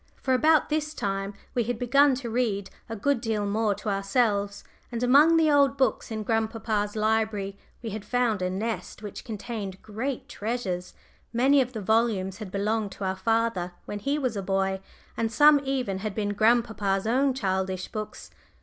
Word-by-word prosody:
For 260 Hz, -, 0 dB
about 310 Hz, +4 st, +4 dB
this 305 Hz, 0 st, -1 dB
time 195 Hz, -1 st, -2 dB, 0.2 s
we 245 Hz, -, +1 dB
had 240 Hz, 0 st, -2 dB
begun 275 Hz, +3 st, +4 dB
to 250 Hz, -2 st, -5 dB
read 220 Hz, -5 st, -1 dB, 0.2 s
a 225 Hz, -, -4 dB
good 275 Hz, +3 st, 0 dB
deal 220 Hz, -3 st, -1 dB
more 210 Hz, 0 st, +1 dB
to 210 Hz, -, -5 dB
ourselves, 200 Hz, 0 st, 0 dB, 0.3 s
and 235 Hz, 0 st, -3 dB
among 295 Hz, +6 st, +6 dB
the 315 Hz, -2 st, +4 dB
old 280 Hz, -1 st, +4 dB
books 265 Hz, -1 st, +1 dB
in 220 Hz, -1 st, -3 dB
grandpapa's 220 Hz, -1 st, -1 dB
library 215 Hz, -2 st, 0 dB, 0.3 s
we 225 Hz, -, -4 dB
had 210 Hz, 0 st, -5 dB
found 230 Hz, -2 st, 0 dB
a 185 Hz, -, 0 dB
nest 215 Hz, +3 st, -4 dB
which 205 Hz, -, -7 dB
contained 210 Hz, -3 st, -5 dB
great 235 Hz, +5 st, -4 dB
treasures; 205 Hz, -5 st, -4 dB, 0.4 s
many 265 Hz, +4 st, +4 dB
of 255 Hz, 0 st, -3 dB
the 220 Hz, -, -4 dB
volumes 205 Hz, -2 st, +1 dB
had 210 Hz, -4 st, -6 dB
belonged 205 Hz, +1 st, -1 dB
to -, -, -8 dB
our 190 Hz, 0 st, 0 dB
father 195 Hz, -3 st, 0 dB
when 205 Hz, -, -5 dB
he 280 Hz, +8 st, 0 dB
was 255 Hz, -6 st, -1 dB
a 200 Hz, -, -2 dB
boy, 195 Hz, 0 st, 0 dB, 0.4 s
and 225 Hz, -1 st, -1 dB
some 295 Hz, +3 st, +6 dB
even 255 Hz, -8 st, -1 dB
had 210 Hz, -1 st, -4 dB
been 205 Hz, -2 st, -1 dB
grandpapa's 220 Hz, -3 st, +2 dB
own 260 Hz, +4 st, +2 dB
childish 190 Hz, -4 st, -1 dB
books. 215 Hz, -1 st, -7 dB
220 Hz, 175 wpm, -27 LUFS, 200-245 Hz, 0.4 s, among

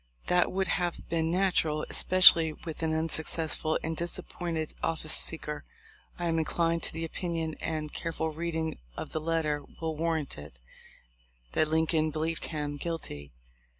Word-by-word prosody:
That 180 Hz, 0 st, +4 dB
would 190 Hz, 0 st, +1 dB
have 175 Hz, -2 st, -1 dB
been 160 Hz, -1 st, +1 dB
natural, 170 Hz, -4 st, +2 dB
especially 170 Hz, -4 st, +7 dB
with 160 Hz, -1 st, -5 dB
an 160 Hz, -1 st, +1 dB
unsuccessful 160 Hz, 0 st, 0 dB
and 160 Hz, 0 st, -2 dB
disappointed 170 Hz, -1 st, -3 dB
office 155 Hz, -1 st, 0 dB
seeker. 150 Hz, -2 st, -1 dB, 0.5 s
I 175 Hz, -, -3 dB
am 165 Hz, -1 st, +2 dB
inclined 165 Hz, +1 st, +1 dB
to -, -, -2 dB
the 165 Hz, -, -3 dB
opinion, 165 Hz, -1 st, -3 dB
and 155 Hz, -2 st, -2 dB
a -, -, -24 dB
careful 160 Hz, -1 st, -2 dB
reading 160 Hz, 0 st, -2 dB, 0.2 s
of -, -, -5 dB
the 155 Hz, -, -2 dB
letter 155 Hz, -2 st, 0 dB, 0.2 s
will 160 Hz, -1 st, -2 dB
warrant 160 Hz, -, -1 dB
it, 75 Hz, -4 st, -11 dB, 0.9 s
that 155 Hz, -, +3 dB
Lincoln 160 Hz, 0 st, +2 dB
believed 160 Hz, +2 st, -1 dB
him 150 Hz, -2 st, -3 dB
guilty. 140 Hz, -, -5 dB
160 Hz, 150 wpm, -30 LUFS, 155-165 Hz, 0.9 s, especially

